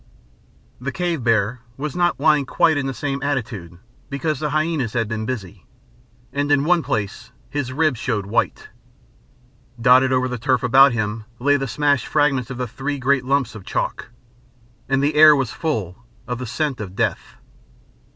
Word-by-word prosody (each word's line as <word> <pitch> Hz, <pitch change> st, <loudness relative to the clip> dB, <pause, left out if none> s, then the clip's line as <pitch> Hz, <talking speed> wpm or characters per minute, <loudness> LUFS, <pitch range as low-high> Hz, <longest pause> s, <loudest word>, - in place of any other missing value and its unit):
The 135 Hz, +3 st, -4 dB
cave 170 Hz, 0 st, -2 dB
bear 115 Hz, +1 st, +1 dB, 0.2 s
was 150 Hz, +4 st, -4 dB
not 175 Hz, -3 st, +1 dB
lying 150 Hz, -2 st, +3 dB
quite 160 Hz, +3 st, +3 dB
in 140 Hz, -2 st, -1 dB
the -, -, -1 dB
same 135 Hz, +2 st, -3 dB
attitude, 115 Hz, -, -3 dB, 0.3 s
because 140 Hz, +1 st, -2 dB
the 150 Hz, 0 st, -1 dB
hyænas 155 Hz, -6 st, -1 dB
had 115 Hz, -2 st, +1 dB
been 110 Hz, 0 st, -4 dB
busy, 110 Hz, -8 st, -6 dB, 0.7 s
and 145 Hz, +1 st, -1 dB
in 145 Hz, -1 st, +4 dB
one 175 Hz, +1 st, +3 dB
place 120 Hz, -3 st, -3 dB, 0.2 s
his 145 Hz, -3 st, -2 dB
ribs 150 Hz, -3 st, +1 dB
showed 110 Hz, -7 st, -2 dB
white. 100 Hz, -, -1 dB, 1.1 s
Dotted 130 Hz, +2 st, +5 dB
over 130 Hz, 0 st, +2 dB
the 125 Hz, -1 st, -4 dB
turf 130 Hz, 0 st, +1 dB
about 135 Hz, +2 st, +6 dB
him 110 Hz, -1 st, -3 dB
lay 145 Hz, +4 st, +2 dB
the 135 Hz, -1 st, -1 dB
smashed 145 Hz, +2 st, +1 dB
fragments 140 Hz, -4 st, +1 dB
of 130 Hz, -, -6 dB
the 125 Hz, 0 st, -2 dB
three 140 Hz, +6 st, -4 dB
great 135 Hz, 0 st, +1 dB
lumps 135 Hz, -2 st, +1 dB
of 105 Hz, -3 st, -10 dB
chalk. -, -, -3 dB, 0.8 s
And 135 Hz, 0 st, +2 dB
the 145 Hz, +2 st, +2 dB
air 155 Hz, 0 st, +8 dB
was 135 Hz, -5 st, -1 dB
full 120 Hz, -, -3 dB, 0.2 s
of 125 Hz, 0 st, -3 dB
the 125 Hz, -, -5 dB
scent 135 Hz, +1 st, -2 dB
of 95 Hz, -3 st, -7 dB
death. -, -, -2 dB
130 Hz, 170 wpm, -21 LUFS, 115-145 Hz, 1.1 s, air